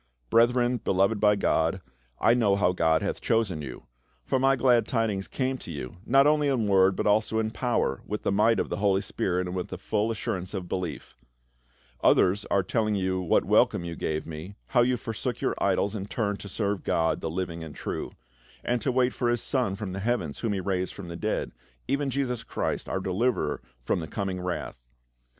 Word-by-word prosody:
" - - -43
Brethren, 120 +1 +4
beloved 100 0 +1
by 105 0 +5
God, 80 -2 +1 0.4
I 115 - +5
know 110 -5 +3
how 95 -2 +3
God 80 -3 +2
hath - - -2
chosen 105 -8 +1
you; 70 -4 -8 0.4
for 130 - +1
my 135 +1 +4
glad 125 -2 +3
tidings 110 -6 0
came 130 -1 -2
to - - -10
you, 70 0 -6
not 135 +2 +5
only 150 0 +3
in 125 -6 +1
word, 95 -1 +4
but - - -2
also 110 +1 +2
in 110 -1 0
power, 120 - 0
with 105 +1 -4
the - - +1
might 105 +2 +3
of - - -1
the - - -2
Holy 100 -1 +2
Spirit, 90 -1 -1
and 90 +1 -5
with 90 - -3
the 95 - -6
full 105 +4 -1
assurance 95 -3 -3
of 90 -2 -4
belief 90 -5 -4 0.9
Others 100 +3 +4
are 100 - +1
telling 110 +2 0 0.3
what - - +4
welcome 85 - +3
you 85 -1 -5
gave 80 -1 -2
me, 80 +5 -8
how 125 - +4
you 125 +1 +2
forsook 115 +1 -4
your - - 0
idols, 100 - +1
and 100 -2 -5
turned 100 -3 -1
to 100 - -8
serve 100 -1 -2
God, 80 0 +1
the 80 - -2
living 85 -1 -4
and 80 -2 -9
true; - - -4 0.5
and 120 -1 0
to 135 - +1
wait 125 0 +2
for 120 - 0
his 120 -1 +1
son 125 -8 +1
from 100 -2 -5
the 100 - -4
heavens, 100 -9 -1
whom 115 -3 -1
he 100 - -1
raised 95 -1 -2
from 95 -4 -8
the 85 - -6
dead, 105 +5 -2 0.4
even 140 +1 0
Jesus 125 -3 -2
Christ - - -3
our 95 - -1
deliverer 105 +7 0 0.2
from - - 0
the 80 - -5
coming 95 -2 -3
wrath. 90 -9 -5
100 Hz, 205 wpm, -27 LUFS, 90-120 Hz, 0.9 s, by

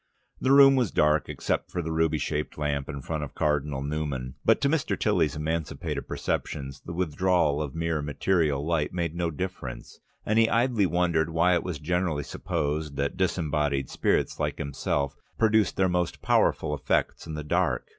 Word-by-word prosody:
The 130 - +1
room 135 0 +8
was 125 -6 +2
dark 75 -1 +2
except - - -2
for 90 - -3
the 80 - -3
ruby 80 -1 +1
shaded 75 +2 -3
lamp 70 -2 -2
in 70 -2 -6
front 80 0 -3
of 70 - -8
Cardinal 75 -3 0
Newman, 70 -4 -3
but - - +4
to - - +3
Mr. 155 +1 0
Tilly's 85 -7 +2
emancipated 80 +1 -3
perceptions 70 -2 -3
the - - -7
withdrawal 85 -3 +1
of 75 -2 -5
mere 80 -1 -1
material 75 -1 0
light 80 -3 0
made 85 -3 -2
no 85 0 -1
difference, 80 -6 -6 0.3
and 110 +1 +2
he 115 0 +4
idly 115 -3 +2
wondered 85 -2 +1
why 85 +2 +3
it 90 - +2
was 90 -4 -4
generally 80 -1 -1
supposed 75 +2 -3
that 70 0 -1
disembodied 75 -7 0
spirits - - 0
like - - -1
himself 70 0 -2 0.2
produced 110 -3 +3
their 95 - +3
most 90 -1 -1
powerful 75 -1 +2
effects 70 +3 -1
in 80 - -5
the 75 - -4
dark. 75 - 0
80 Hz, 175 wpm, -27 LUFS, 75-90 Hz, 0.3 s, room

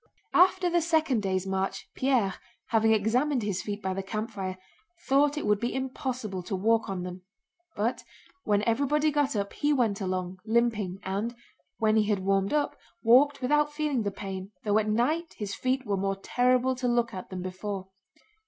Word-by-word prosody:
After 370 0 +5
the 345 0 +2
second 315 -7 +2
day's 190 -1 -1
march 190 0 -2
Pierre, 250 -8 +1 0.4
having 225 -1 +3
examined 240 +5 +2
his 195 -3 -1
feet 205 -1 -5
by 190 0 -1
the 195 - -2
campfire, 195 -2 -4 0.5
thought 285 +2 +3
it - - -2
would 210 -1 +3
be 240 +3 -2
impossible 255 -6 -3
to 195 +3 -4
walk 225 +3 +2
on 185 -2 -3
them; 180 0 -7 0.5
but 225 +5 -1 0.4
when 205 -1 +2
everybody 285 +7 +2
got 285 -3 +1
up 200 -1 -2
he 295 0 +1
went 230 -8 +1
along, 185 -1 -3
limping, 220 -4 +1
and, 205 +5 -2 0.4
when 220 0 +3
he 215 - +4
had 205 - +3
warmed 195 0 +2
up, 300 -1 +1 0.3
walked 260 +4 +5
without 295 +3 +2
feeling 295 -4 -1
the 205 - 0
pain, 195 0 -6
though 210 0 +3
at 215 0 -1
night 305 +10 0
his 205 -2 -4
feet 255 +3 -1
were 200 -2 0
more 195 +1 0
terrible 250 +4 +2
to 250 0 -1
look 240 -1 +1
at 185 - -7
than 185 -1 -5
before. 190 +1 -5
220 Hz, 180 wpm, -28 LUFS, 195-260 Hz, 0.5 s, After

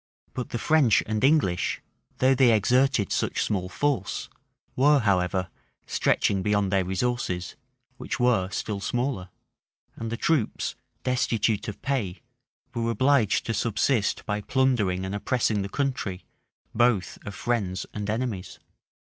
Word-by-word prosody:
But 125 - -4
the - - -3
French 140 -4 +3
and 110 0 -2
English, 135 - +2 0.4
though 130 +1 +4
they 130 -2 +5
exerted 125 0 +2
such - - 0
small 90 -3 -2
force, 130 -6 -1 0.5
were, 145 +3 +5
however, 95 -3 +1 0.4
stretching 100 -2 +1
beyond 105 -1 +1
their 95 -1 +2
resources, 95 -2 -2 0.4
which 120 - -4
were 115 -7 +2
still 100 +1 -3
smaller; 120 -4 -2 0.7
and 115 0 -5
the 115 - -2
troops, 150 -7 0 0.3
destitute 115 -4 0
of 105 - -7
pay, 125 -8 -2 0.5
were 115 -1 -1
obliged 125 -1 +2
to 115 - -1
subsist 110 +1 0
by 105 -1 -2
plundering 105 -8 +1
and 95 - -4
oppressing 110 0 0
the 100 - -4
country, 125 -8 -2 0.5
both 110 -5 +1
of 100 - -7
friends 100 -6 -1
and 105 0 -4
enemies. 110 -4 -3
110 Hz, 130 wpm, -26 LUFS, 100-125 Hz, 0.7 s, they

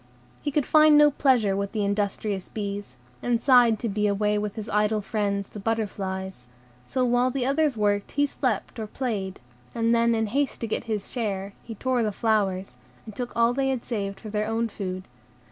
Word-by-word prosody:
He - - -1
could 290 -1 +1
find 310 -1 +6
no 295 0 +7
pleasure 245 -8 +3
with 200 0 -3
the 210 -2 0
industrious 200 -1 -1
bees, 205 -1 -5 0.3
and 240 -1 +1
sighed 240 -3 +5
to 230 - -3
be 210 0 0
away 210 +1 +1
with 210 -1 -3
his 215 -1 -6
idle 210 +1 +1
friends, 200 -1 -2
the 210 - -8
butterflies; 190 - -3 0.4
so 255 -1 0
while 245 +1 +3
the 255 -1 -1
others 280 -1 +1
worked 205 -1 0
he 285 +1 +3
slept 250 -5 -2
or 215 - -4
played, 210 -6 -3 0.4
and 230 0 +2
then, 235 0 +3
in 220 0 +1
haste 275 +6 -1
to 230 - -2
get 215 - -2
his 215 -3 -3
share, 200 -5 -3
he 225 - -8
tore 255 +3 0
the 215 -2 0
flowers, 200 -3 0 0.3
and 215 -2 -10
took 245 -1 -5
all 235 +1 +4
they 270 +1 0
had 260 -3 -2
saved 200 -5 -3
for 215 - -8
their 210 0 -1
own 225 +1 0
food. 185 -3 -5
220 Hz, 195 wpm, -26 LUFS, 200-245 Hz, 0.4 s, no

